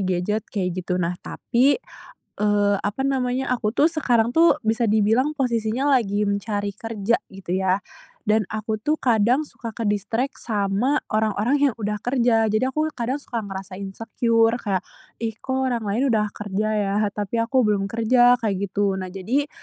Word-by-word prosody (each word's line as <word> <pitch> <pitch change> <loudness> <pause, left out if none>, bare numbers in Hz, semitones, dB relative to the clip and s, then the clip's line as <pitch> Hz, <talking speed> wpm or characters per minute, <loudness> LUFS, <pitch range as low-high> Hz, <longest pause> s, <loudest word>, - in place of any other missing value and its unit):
gadget, 185 +4 -1
kayak 185 -4 -2
gitu. 180 0 -2
Nah, 175 -1 0
tapi, 260 +4 +1 0.6
eee, 205 -1 +2
apa 205 +6 -2
namanya, 260 -1 0
aku 215 -3 -1
tuh 290 +7 +4
sekarang 245 -8 +1
tuh, 335 +1 +5
bisa 225 0 +1
dibilang 220 +7 +3
posisinya 235 +1 0
lagi 210 -6 +2
mencari 205 0 -2
kerja, 225 0 -1 0.2
gitu 190 -2 -8
ya. 190 +1 +1 0.4
Dan 215 -1 +2
aku 215 0 -2
tuh 300 +9 0
kadang, 240 +3 +3
suka 230 -6 -8
ke-distract 225 +5 -1
sama 210 +6 0
orang-orang 215 +4 +1
yang - - -12
udah 210 0 -2
kerja. 235 -2 +2
Jadi 215 +3 +1
aku 305 +4 0
kadang 250 +3 -2
suka 240 -5 -5
ngerasa 195 -2 -7
insecure 225 +3 +1
kayak, 195 -4 -1 0.3
"Ih, 225 -1 -3
kok 260 0 -2
orang 240 -2 -1
lain 210 +5 0
udah 210 -1 +1
kerja 210 +1 -3
ya, 200 -1 0
tapi 210 +2 -2
aku 245 +1 +2
belum 200 -2 +1
kerja", 245 +2 +4
kayak 200 -4 -2
gitu. 200 0 +1
Nah, 185 -1 -5
jadi 240 +11 -1
220 Hz, 160 wpm, -23 LUFS, 205-245 Hz, 0.6 s, tuh